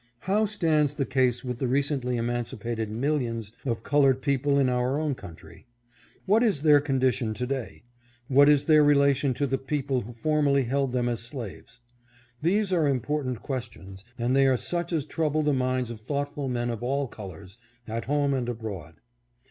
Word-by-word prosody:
How 210 +3 +1
stands 155 -8 +1
the 140 - -1
case 130 -1 +1
with 125 -1 -4
the 130 - 0
recently 130 -1 0
emancipated 120 -1 -3
millions 115 -3 -2 0.2
of 115 -2 -2
colored 135 -2 +3
people 140 0 +1
in 135 -2 +3
our 125 +3 0
own 155 -2 0
country? 85 0 -12 0.6
What 210 +4 +4
ia 225 -4 +4
their 145 0 +4
condition 130 -5 0
to 125 +4 -2
day? 130 -3 -5 0.4
What 140 +2 +6
is 145 -2 +4
their 155 -2 +6
relation 140 -2 +3
to 145 - 0
the 135 0 -1
people 135 -1 -1
who 120 +3 -9
formerly 140 +2 +2
held 135 +2 0
them 125 -1 0
as 120 -2 -1
slaves? 120 0 -8 0.6
These 195 +4 +1
are 165 -4 +3
important 135 -1 -1
questions, 115 -8 -6
and 120 +2 0
they 135 0 +5
are 130 -1 +3
such 175 +6 -3
as 155 -5 0
trouble 155 -1 0
the 150 -1 +2
minds 130 -2 0
of 115 - -8
thoughtful 145 +3 -3
men 120 -1 -1
of 115 - -5
all 135 +3 -1
colors, 95 -1 -11 0.3
at 115 +1 -4
home 145 0 +1
and 125 -2 -1
abroad. 105 -8 -6
135 Hz, 175 wpm, -26 LUFS, 120-145 Hz, 0.6 s, What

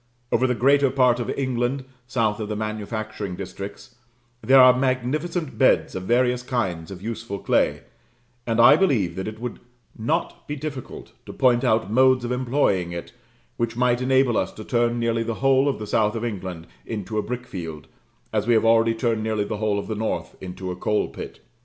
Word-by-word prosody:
Over 130 +2 +3
the 125 - 0
greater 140 +2 +4
part 125 -2 +3
of 120 - -3
England, 130 0 -1 0.2
south 115 -4 0
of 105 -1 -4
the 105 - -2
manufacturing 110 -2 -4
districts, 100 +6 -8 0.5
there 135 +1 +6
are 130 -1 +8
magnificent 135 +6 -1
beds - - +3
of 95 0 -5
various 125 +2 +2
kinds 95 -11 -2
of 95 -1 -9
useful 115 -2 -5
clay; - - +1 0.7
and 115 0 0
I 120 +3 +8
believe 125 - +1
that 95 +1 -4
it 110 0 -6
would 120 0 -5 0.4
not 155 +10 -2
be 150 - -3
difficult 140 -2 -7 0.2
to - - -7
point 125 -1 +3
out 110 -4 +1
modes 130 +1 +4
of 120 - -3
employing 125 -8 +1
it 85 +5 -7 0.4
which 115 0 -2
might 125 0 +2
enable 130 -2 +3
us - - 0
to 110 - -9
turn 120 -1 +1
nearly 115 -1 0
the 115 0 -2
whole 135 +2 +3
of 140 - -2
the 105 - -6
south 105 +1 +1
of 115 +1 -2
England 95 -6 -5 0.2
into 110 0 -4
a - - +1
brickfield, 90 - -6 0.5
as - - 0
we 120 - +4
have 110 - +3
already 115 0 +4
turned 115 -1 0
nearly 110 -1 0
the 105 +1 -4
whole 105 -1 0
of 100 - -3
the 110 - -3
north 110 +1 -3
into 90 0 -6
a - - -4
coal 105 +3 0
pit. - - -9
115 Hz, 190 wpm, -23 LUFS, 105-130 Hz, 0.7 s, are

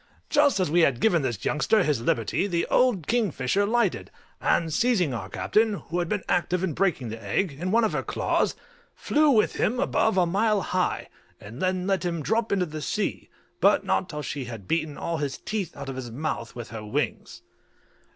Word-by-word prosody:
Just 290 -7 +4
as 180 -5 0
we 175 - +4
had 135 -7 +3
given 175 -7 +3
this 120 -7 -3
youngster 205 +7 +2
his 145 -8 0
liberty 115 - 0
the 170 -3 0
old 240 - +3
kingfisher 200 - +1
lighted, 235 +2 0 0.3
and 165 -2 +1
seizing 190 - +2
our 115 - -5
captain, 215 -1 +1
who 175 -2 -4
had 175 -1 -1
been 205 -3 -1
active 180 +1 0
in 180 -5 -1
breaking 170 -10 0
the 115 0 -7
egg, 155 - 0
in 165 +7 -4
one 230 +4 +3
of 220 - +2
her - - 0
claws, - - 0 0.4
flew 300 0 +2
with 220 -6 +3
him 245 +3 +1
above 220 -4 +1
a 180 - +4
mile 205 +3 +2
high, 185 0 -1 0.3
and 110 +6 -10
then 185 -1 0
let 195 -1 0
him 170 -3 -2
drop 225 +6 0
into 190 -2 +2
the 155 -2 -7
sea, 210 +7 -2 0.3
but - - +4
not - - 0
till 150 -1 -5
she 140 -3 -4
had 115 -6 -8
beaten 155 -3 -1
all 170 -1 -2
his 140 -3 -3
teeth 200 -6 -4
out 140 -1 -7
of 135 - -5
his 125 -2 -5
mouth 120 -2 -4
with 120 -1 -7
her 110 -2 -6
wings. 105 - -3
175 Hz, 200 wpm, -26 LUFS, 140-205 Hz, 0.4 s, Just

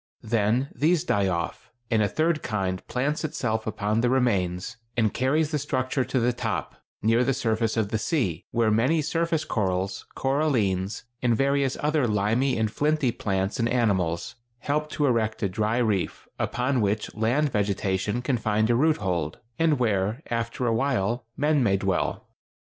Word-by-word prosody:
Then 115 +4 +1
these 160 +2 +2
die 100 - +1
off, 85 -2 -3 0.2
and 110 -1 +3
a 105 - +3
third 155 0 +1
kind 95 -4 -2
plants 145 +6 -1
itself 120 -8 -2
upon 110 +1 0
their 120 - +2
remains 110 -4 0 0.2
and 110 -3 +2
carries 150 +4 +1
the 150 - 0
structure 130 -1 -1
to 130 - -1
the 120 +1 +2
top, 115 -2 -3 0.3
near 115 +3 +4
the 135 +1 +1
surface 115 -1 0
of 110 -3 +1
the 110 -1 -1
sea, 110 - -1
where 115 -2 +2
many 130 +9 +2
surface 165 +1 0
corals, 95 -1 -1
corallines, 115 -9 0 0.2
and 120 -2 +3
various 140 -1 +1
other 150 -3 +2
limy 110 +6 +1
and 110 -2 0
flinty 150 -1 +1
plants 95 +1 -2
and 115 0 +1
animals 95 -9 0 0.3
help 150 +1 -1
to 150 - 0
erect 115 -4 0
a - - +3
dry 110 +4 0
reef, 105 -7 -1
upon 125 0 0
which 105 +1 -1
land 125 +7 +1
vegetation 100 +2 0
can 130 -1 +1
find 110 +1 +1
a - - +3
root 155 +5 +3
hold, 85 -7 -2 0.2
and 160 -3 +3
where, 110 +2 0
after 115 +1 -2
a 115 - +2
while, 120 -2 0
men 150 0 +2
may 100 -5 +3
dwell. 95 -1 -1
115 Hz, 165 wpm, -26 LUFS, 105-135 Hz, 0.3 s, near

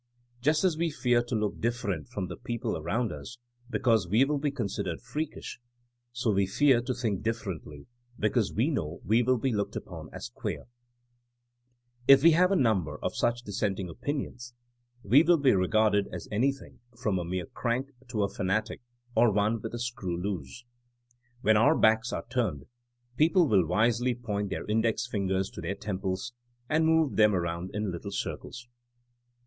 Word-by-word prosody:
Just 155 +5 +2
as 180 -4 +2
we 170 0 +1
fear 125 -5 +2
to 120 0 -4
look 105 -1 -1
different 110 - -2
from 100 - -4
the 90 - -6
people 120 -3 -3
around 100 +9 -1
us 125 - -8 0.3
be - - -1
cause 115 -7 +2
we 110 +9 +4
will 145 0 -1
be 145 +1 0
considered 120 -8 -3
freakish, 155 -4 -5 0.5
so 120 -2 0
we 100 -1 +2
fear 130 +4 +4
to 125 +1 -3
think 110 -6 -1
differently 95 -10 -4 0.3
because 110 0 +1
we 130 +9 +1
know 85 - -3
we 110 +5 +4
will 130 +1 +2
be 130 +3 0
looked 100 -1 -2
upon - - -7
as - - -7
queer/' - - -4 1.4
If 135 0 +8
we 170 - +8
have 180 +4 +4
a - - +4
number 110 - +1
of - - -2
such 120 0 0
dissenting 100 -3 -2
opinions 120 - -5 0.5
we 125 +9 +6
will 170 +1 +4
be 140 -3 +4
regarded 105 +2 +2
as - - -6
anything 135 +6 -1 0.2
from 105 -6 0
a - - -2
mere 90 +1 -3
crank 125 +3 -2 0.2
to 110 -4 -1
a - - +2
fanatic 100 +3 -2 0.3
or 115 0 +5
one 105 +2 +1
with 115 +2 -5
a - - -5
screw 100 -8 -3
loose. 95 - -5 0.2
' 120 0 -41
' 120 0 -37
When 110 -2 +5
our 145 +8 +5
backs 110 +2 +3
are - - -4
turned 115 - -1 0.5
people 165 +3 +4
will 95 - +3
wisely 120 +5 +2
point 105 -4 -3
their - - -4
index 110 +2 +1
fin 100 -5 -2
gers 95 0 0
to - - -8
their 90 +4 -3
temples 100 +3 -3 0.3
and 160 +1 +2
move 160 -3 +2
them 105 -2 +5
around 85 0 -2
in 105 -2 -1
little 85 +3 -6
circles. 120 +4 -5
115 Hz, 180 wpm, -29 LUFS, 100-125 Hz, 1.4 s, If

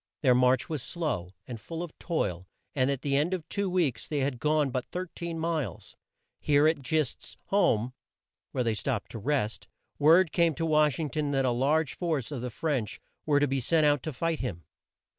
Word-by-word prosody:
Their 130 -3 +6
march 125 0 +3
was 155 -5 -3
slow, 125 - -3
and 115 -3 -7
full 165 0 -5
of 170 - -9
toil, 95 - -2 0.3
and 130 -1 +2
at 140 -2 -2
the 140 -1 +1
end 155 +6 +2
of 165 -3 -8
two 200 -1 -1
weeks 160 -11 0
they 150 -3 -1
had 135 -2 -1
gone 150 0 +2
but 125 0 -3
13 170 -2 -5
miles. 160 -4 -3 0.4
Here 145 +1 +4
at 160 -3 +1
Gist's 155 0 -2
home, 130 - +2 0.6
where 130 - 0
they 115 -2 +1
stopped 110 +1 -2
to 115 - -6
rest, 115 -2 -1 0.3
word 160 +3 +6
came 170 -3 +2
to 165 - -1
Wash 150 -3 +3
ing 155 -4 -3
ton 150 +2 -1
that 135 -1 +2
a 125 - +2
large 140 +5 +1
force 155 -7 -2
of 135 -5 -4
the 125 - -3
French 130 -3 -2 0.3
were 145 -2 +4
to 145 - +3
be 135 0 0
sent 155 +5 +3
out 145 -2 +3
to 155 - -4
fight 165 +4 -1
him. 90 -10 -4
145 Hz, 200 wpm, -28 LUFS, 125-160 Hz, 0.6 s, Their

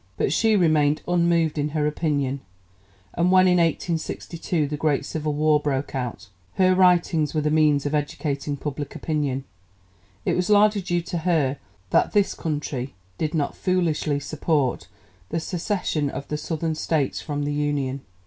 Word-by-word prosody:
But - - +1
she 220 -1 +3
remained 155 -5 +3
unmoved 170 -3 +2
in 145 +1 0
her 150 - +1
opinion, 145 -3 -1 0.7
and 175 +1 +2
when 185 0 +6
in 180 -1 +4
1862 165 -1 -1
the 150 - -3
great 150 -1 0
Civil 155 -1 -2
War 150 0 +3
broke 145 -2 -2
out, 120 -6 -4 0.3
her 185 -1 +4
writings 175 -4 +3
were 155 - +2
the 150 0 0
means 150 -2 +3
of 145 - -1
educating 145 -1 -2
public 145 0 -5
opinion. 145 -4 -2 0.8
It - - +1
was 180 +1 0
largely 210 0 +5
due 175 -1 -1
to 175 0 -3
her 155 -6 +1 0.3
that - - +3
this 205 -1 +3
country 145 - -4 0.2
did 155 +1 -1
not 145 -3 -1
foolishly 165 -5 0
support 145 - -1 0.4
the 165 - -1
secession 170 -4 -1
of 140 +1 -6
the 150 - -1
Southern 160 +1 -2
States 155 -2 -1
from 145 -2 -3
the 145 0 -1
Union. 145 -2 -1
155 Hz, 160 wpm, -24 LUFS, 145-170 Hz, 0.8 s, when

